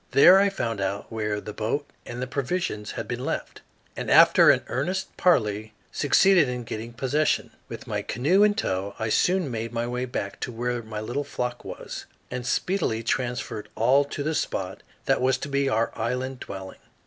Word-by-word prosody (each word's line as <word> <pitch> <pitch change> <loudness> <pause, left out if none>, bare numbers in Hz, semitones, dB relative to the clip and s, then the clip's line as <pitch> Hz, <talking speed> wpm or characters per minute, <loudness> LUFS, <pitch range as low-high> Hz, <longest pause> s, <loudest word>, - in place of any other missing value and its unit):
There 180 +7 +8
I 200 0 +4
found 115 - -3
out 100 +3 -3
where 105 -2 -2
the 105 0 -8
boat 115 +8 -2 0.2
and 120 +1 -4
the - - -1
provisions 130 -5 -2
had - - -5
been - - -4
left, - - -4 0.3
and - - -4
after - - +7
an - - +4
earnest 180 +10 -2
parley 110 - +2 0.2
succeeded 175 0 +4
in 125 -1 -3
getting 115 0 -6
possession. 145 +5 0 0.2
With - - -7
my - - -2
canoe 150 - +2
in 210 0 +5
tow 100 - -2
I 110 - -2
soon 180 - +2
made 115 0 -3
my 120 0 -2
way 125 +1 -2
back 100 -5 -4
to - - -4
where 120 +1 -2
my 110 -1 -6
little 125 +6 -2
flock 125 -3 -4
was, - - -7 0.2
and 125 -1 -4
speedily 160 - 0
transferred 115 -3 -2
all 130 +5 +4
to 145 0 -5
the 155 +2 -1
spot 95 -10 -3 0.2
that - - +2
was 130 0 +3
to 135 - -5
be 140 0 +1
our 115 -2 +1
island 125 +3 -2
dwelling. 95 -4 -8
125 Hz, 185 wpm, -25 LUFS, 110-145 Hz, 0.3 s, There